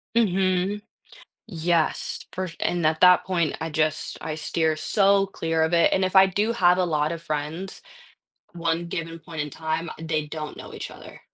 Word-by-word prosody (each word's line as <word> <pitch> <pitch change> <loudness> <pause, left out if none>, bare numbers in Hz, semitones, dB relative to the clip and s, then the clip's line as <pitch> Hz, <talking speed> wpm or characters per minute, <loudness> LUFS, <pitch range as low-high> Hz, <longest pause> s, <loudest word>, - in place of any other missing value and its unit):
Mhm. 190 -1 +1 0.7
Yes, 170 -4 -1
fer 185 0 -3
and 175 -3 +1
at 155 0 +1
that 180 0 +7
point, 170 -5 0
I 160 - -2
just 155 0 -1
I 155 -1 -4
steer 160 0 0
so 195 +4 +3
clear 165 -4 -1
of 160 - +1
it, 170 -1 +4
and 190 - +2
if 185 +1 -1
I 190 0 +9
do 205 +4 0
have 180 -5 +4
a 180 - +3
lot 155 -1 0
of 165 - -6
friends, 155 +5 -4 0.7
one 170 0 -1
given 165 0 -5
point 160 -1 -7
in 150 - -3
time, 160 +2 -3
they 155 -2 -2
don't 155 0 -6
know - - -10
each - - -6
other. - - -12
165 Hz, 180 wpm, -25 LUFS, 160-185 Hz, 0.7 s, I